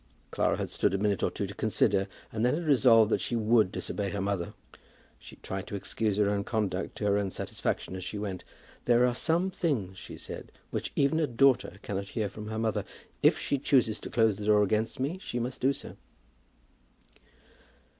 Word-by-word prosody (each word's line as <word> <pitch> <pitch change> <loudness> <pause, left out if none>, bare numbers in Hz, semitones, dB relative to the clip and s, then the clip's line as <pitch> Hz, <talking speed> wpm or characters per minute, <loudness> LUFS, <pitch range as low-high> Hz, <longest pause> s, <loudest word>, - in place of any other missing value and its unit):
Clara - - +1
had - - -4
stood - - +1
a - - +1
minute 100 -1 0
or - - +2
two - - -3
to - - -7
consider, 100 0 +1 0.2
and 110 0 -2
then 125 +4 +3
had 170 +1 -3
resolved 120 -6 +5
that - - +2
she 120 - -2
would 110 -3 +3
disobey 100 -1 -3
her 100 - -3
mother. 95 -3 -2 0.6
She - - -12
tried 95 0 -6
to - - -5
excuse 105 +1 -1
her 105 -1 +3
own 100 0 0
conduct 100 -4 -2
to 105 - -3
her 100 0 +3
own 100 -1 -1
satisfaction 95 - -3
as 95 - -5
she 105 - -5
went. 100 -3 -4 0.4
"There 120 0 +5
are 125 - +2
some 170 +8 +1
things," 110 - -2
she - - -9
said, - - -8 0.2
"which - - -3
even 140 +3 +2
a 155 - +2
daughter 130 +1 +3
cannot 100 -5 -3
hear 105 -2 0
from 105 +2 -8
her 110 0 -4
mother. 110 -1 0 0.4
If - - +5
she 140 - -1
chooses 125 -6 +2
to - - -7
close 110 -3 +3
the 105 - -6
door 105 -1 +5
against 110 +4 0
me, 145 +8 -2
she 125 - -5
must 120 +2 -3
do 130 +2 +4
so." 140 - -8
110 Hz, 205 wpm, -29 LUFS, 100-125 Hz, 0.6 s, resolved